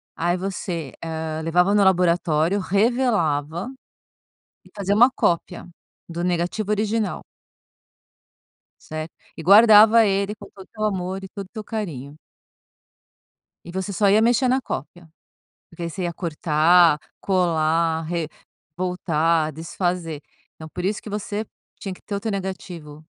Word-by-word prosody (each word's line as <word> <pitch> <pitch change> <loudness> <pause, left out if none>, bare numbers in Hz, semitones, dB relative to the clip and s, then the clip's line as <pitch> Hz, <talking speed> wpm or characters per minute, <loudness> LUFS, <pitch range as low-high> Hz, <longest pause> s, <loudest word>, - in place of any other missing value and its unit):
Aí 175 +2 0
você, 175 -6 -4
ah, 160 -1 -4
levava 180 +4 +2
no 205 -1 +4
laboratório, 175 -1 +2
revelava 195 - 0 1.0
e - - -18
fazia 200 0 0
uma 240 +4 +7
cópia 175 -4 -1 0.4
do 170 +1 -4
negativo 180 +4 -1
original. 210 -1 -1 1.6
Certo 155 +1 -7 0.2
e - - -6
guardava 215 +3 +7
ele 200 +1 0
com - - -13
todo 195 - -13
o - - -26
teu 215 - -7
amor 190 -2 -2
e 190 - -8
todo 200 -1 -7
o - - -55
teu 215 - -7
carinho. 155 - -6 1.5
E 170 - -10
você 190 +2 -4
só 200 +2 +3
ia 210 +2 +5
mexer 240 +3 +3
na 260 +1 +2
cópia, 170 - -7 0.6
porque 170 0 -6
você 185 +3 -5
ia 175 -1 -2
cortar, 165 -1 +3 0.2
colar, 165 -3 +1
re 165 0 -3 0.5
voltar, 165 -3 0
desfazer. 165 0 -3 0.3
Então, 160 - -10
por 180 - -4
isso 200 +1 -1
que - - -9
você 210 +1 -4 0.3
tinha 195 -2 -5
que - - -16
ter 205 - -5
o - - -2
teu 220 +1 -3
negativo 180 -6 -6
180 Hz, 140 wpm, -22 LUFS, 165-205 Hz, 1.6 s, uma